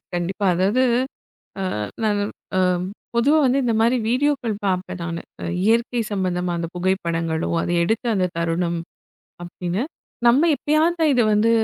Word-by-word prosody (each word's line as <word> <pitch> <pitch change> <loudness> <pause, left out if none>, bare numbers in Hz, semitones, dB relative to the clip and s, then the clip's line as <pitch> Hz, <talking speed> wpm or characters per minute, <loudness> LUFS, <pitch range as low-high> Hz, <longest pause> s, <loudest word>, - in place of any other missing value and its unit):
கண்டிப்பா. 185 +3 -1
அதாவது 200 +8 +2 0.8
அ - - -1 0.4
நான் 210 -2 +2 0.4
அ - - +4 0.6
பொதுவா 280 +7 +4
வந்து 260 +2 +3
இந்த 235 -2 +1
மாரி 235 +3 +3
வீடியோக்கள் 255 -3 +1
பார்ப்பேன் 185 -1 -2
நானு. 170 0 -4 0.4
இயற்கை 235 +2 +2
சம்மந்தமா 180 -2 -1
அந்தப் 170 +1 -4
புகைப்படங்களோ, 170 -3 -1
அதை 175 - -1
எடுத்த 225 +7 -1
அந்தத் 185 -3 0
தருணம், 170 +1 0 0.6
அப்படின்னு. 175 +5 -3 0.4
நம்ம 275 +8 +5
எப்பயாவது 310 +4 +2
தான் 310 -3 +4
இதை 245 -3 +3
வந்து 215 +2 +3
200 Hz, 135 wpm, -22 LUFS, 175-245 Hz, 0.8 s, நம்ம